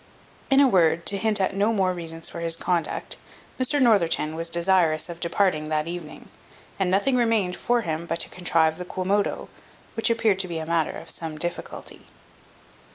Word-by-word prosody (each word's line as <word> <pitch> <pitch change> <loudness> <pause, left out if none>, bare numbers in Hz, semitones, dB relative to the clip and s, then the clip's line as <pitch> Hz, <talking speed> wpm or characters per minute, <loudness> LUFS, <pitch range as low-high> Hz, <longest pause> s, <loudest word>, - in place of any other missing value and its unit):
In 270 -1 +5
a 280 - +7
word, 170 -6 +3
to 200 - +2
hint 215 -1 +2
at 190 0 0
no 205 +3 +2
more 190 -4 +1
reasons 165 -2 -5
for - - -7
his 165 -1 +1
conduct, 170 -2 -2 0.4
Mr 285 +3 +2
Northerton 195 - +3
was 165 +1 -2
desirous 170 -2 +2
of 170 -1 -7
departing 170 -3 0
that 155 0 0
evening, 170 -3 -8 0.5
and 190 -2 +1
nothing 200 +8 +2
remained 225 -7 +1
for 240 0 +1
him 165 -3 -4
but 165 - -1
to - - -3
contrive 165 -2 +1
the 180 - -5
quomodo, 195 +3 -1 0.5
which 225 - +1
appeared 225 -4 +2
to 190 - -1
be 170 -2 -4
a 160 - -4
matter 165 -1 0
of - - -6
some 160 -2 -6
difficulty. 175 +2 -5
180 Hz, 180 wpm, -24 LUFS, 165-205 Hz, 0.5 s, a